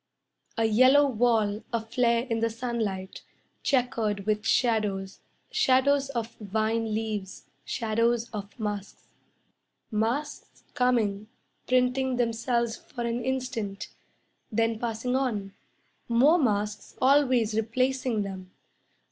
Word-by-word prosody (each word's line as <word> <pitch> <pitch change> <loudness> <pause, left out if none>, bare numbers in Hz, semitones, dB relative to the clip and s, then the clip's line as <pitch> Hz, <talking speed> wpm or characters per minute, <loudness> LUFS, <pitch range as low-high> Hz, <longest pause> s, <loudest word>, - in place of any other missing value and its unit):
A 225 - +2
yellow 255 +6 +6
wall 225 -4 +1
Aflare 235 +1 +1
in 230 -2 -1
the 230 0 +1
sunlight, 220 -5 -4 0.4
Chequered 225 -6 0
with 215 0 0
shadows, 210 -6 +1 0.3
Shadows 275 -6 +3
of 235 -4 -4
vine 220 +2 -1
leaves, 215 -3 -3 0.2
Shadows 230 0 0
of 205 +1 -7
masks. 205 -2 -5 0.8
Masks 235 +8 -2
coming, 220 -5 +1 0.4
printing 255 +1 +2
themselves 235 0 0
for 240 - -7
an 235 +1 -2
instant, 250 -6 -3 0.6
Then 225 0 +1
passing 235 +2 -2
on, 215 -7 -1 0.6
More 275 +9 +5
masks 210 -5 -1
always 255 -5 +3
replacing 240 +1 0
them. 190 -2 -7
230 Hz, 100 wpm, -27 LUFS, 215-250 Hz, 0.8 s, yellow